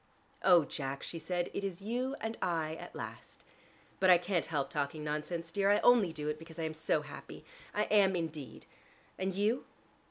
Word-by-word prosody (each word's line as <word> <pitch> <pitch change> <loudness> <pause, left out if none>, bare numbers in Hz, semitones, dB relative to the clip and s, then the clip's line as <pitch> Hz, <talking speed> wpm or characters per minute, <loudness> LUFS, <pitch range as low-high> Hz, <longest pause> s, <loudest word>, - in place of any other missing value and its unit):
"Oh, 175 -5 +7
Jack," 135 -1 -4
she 165 - -4
said, 175 +2 -2
"it - - -3
is 190 -3 -3
you 250 +5 -1
and 225 +1 -3
I 160 -3 0
at - - -9
last. - - -8 0.5
But 185 - +4
I 180 - +9
can't 175 0 0
help 145 -4 -1
talking 150 +1 -2
nonsense, 155 +3 -3
dear. 200 +2 +2
I 205 - +6
only 235 -8 +6
do 150 -2 -4
it 150 0 -2
because 165 0 -12
I'm 160 -1 -2
so 155 -1 0
happy. 150 0 -10 0.3
I 210 - +1
am 200 -3 +4
indeed. 160 -5 -5 0.5
And 190 +1 0
you?" 215 +6 +1
170 Hz, 185 wpm, -33 LUFS, 155-195 Hz, 0.5 s, I